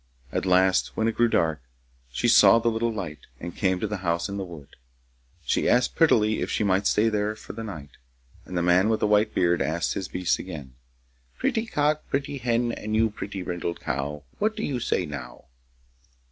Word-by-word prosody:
At -, -, -2 dB
last, 95 Hz, +1 st, +3 dB
when 110 Hz, -, +1 dB
it 115 Hz, -, +1 dB
grew 120 Hz, +1 st, +3 dB
dark, 80 Hz, -, +1 dB, 0.5 s
she 60 Hz, -, 0 dB
saw -, -, +7 dB
the 115 Hz, 0 st, +2 dB
little 115 Hz, +1 st, 0 dB
light, 90 Hz, -9 st, -5 dB, 0.2 s
and 85 Hz, 0 st, -7 dB
came 95 Hz, -2 st, +1 dB
to -, -, -1 dB
the 105 Hz, -1 st, -3 dB
house 85 Hz, -1 st, -1 dB
in 100 Hz, 0 st, -5 dB
the 100 Hz, -, -3 dB
wood. 85 Hz, -6 st, -10 dB, 0.8 s
She -, -, +1 dB
asked 125 Hz, 0 st, +3 dB
prettily 110 Hz, -10 st, +3 dB
if -, -, -2 dB
she -, -, 0 dB
might 100 Hz, 0 st, +2 dB
stay 110 Hz, +2 st, +3 dB
there 105 Hz, -1 st, 0 dB
for -, -, -10 dB
the 115 Hz, -, -6 dB
night, 80 Hz, -10 st, -8 dB, 0.5 s
and 90 Hz, -, -6 dB
the 85 Hz, -, +1 dB
man 90 Hz, +4 st, +4 dB
with 110 Hz, -, +1 dB
the -, -, +1 dB
white 105 Hz, +1 st, +2 dB
beard 85 Hz, -2 st, +2 dB
asked 80 Hz, +5 st, 0 dB
his 95 Hz, -, -4 dB
beasts 90 Hz, -1 st, 0 dB
again: 75 Hz, -8 st, -8 dB, 0.6 s
Pretty 225 Hz, 0 st, 0 dB
cock, 150 Hz, -4 st, +1 dB
Pretty 140 Hz, 0 st, -2 dB
hen, 120 Hz, -1 st, +1 dB
And 110 Hz, -1 st, -4 dB
you, 110 Hz, 0 st, +3 dB
pretty 100 Hz, -2 st, -6 dB
brindled 85 Hz, -1 st, -4 dB
cow, 70 Hz, +2 st, -3 dB, 0.2 s
What 215 Hz, +1 st, +1 dB
do -, -, -4 dB
you 130 Hz, -4 st, -1 dB
say -, -, 0 dB
now? -, -, -8 dB
100 Hz, 200 wpm, -25 LUFS, 85-115 Hz, 0.8 s, saw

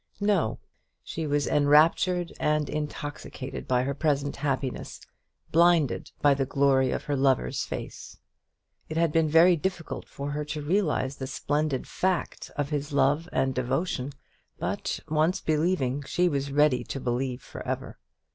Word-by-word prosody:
No; 200 Hz, -, +1 dB, 0.5 s
she 160 Hz, -1 st, -4 dB
was 145 Hz, -1 st, +1 dB
enraptured 160 Hz, +4 st, +3 dB
and 150 Hz, -1 st, +1 dB
intoxicated 145 Hz, -3 st, -5 dB
by 125 Hz, -1 st, +2 dB
her 140 Hz, +2 st, -1 dB
present 145 Hz, -1 st, 0 dB
happiness, 135 Hz, -2 st, -3 dB, 0.5 s
blinded 170 Hz, -4 st, +3 dB
by 145 Hz, -1 st, +6 dB
the 135 Hz, 0 st, 0 dB
glory 135 Hz, -1 st, +3 dB
of -, -, -2 dB
her 145 Hz, -, -1 dB
lover's 130 Hz, -, +1 dB
face. -, -, -7 dB, 0.7 s
It 155 Hz, -, -3 dB
had 165 Hz, -1 st, +3 dB
been 160 Hz, 0 st, +2 dB
very 170 Hz, +3 st, +6 dB
difficult 175 Hz, 0 st, -4 dB
for 140 Hz, +1 st, -5 dB
her 150 Hz, +1 st, -2 dB
to 150 Hz, 0 st, -5 dB
realize 150 Hz, -5 st, 0 dB
the 130 Hz, -, -5 dB
splendid 145 Hz, -1 st, -1 dB
fact 185 Hz, -1 st, -2 dB
of 145 Hz, 0 st, -2 dB
his 145 Hz, 0 st, -2 dB
love 145 Hz, +4 st, +2 dB
and 130 Hz, 0 st, +1 dB
devotion; 130 Hz, +2 st, -1 dB, 0.4 s
but -, -, -3 dB
once 160 Hz, +4 st, +2 dB
believing, 150 Hz, -5 st, 0 dB
she 180 Hz, +5 st, +1 dB
was 140 Hz, -3 st, -1 dB
ready 145 Hz, -2 st, +3 dB
to 135 Hz, -, -5 dB
believe 125 Hz, +1 st, -2 dB
for -, -, -9 dB
ever. -, -, -4 dB
145 Hz, 145 wpm, -27 LUFS, 135-160 Hz, 0.7 s, by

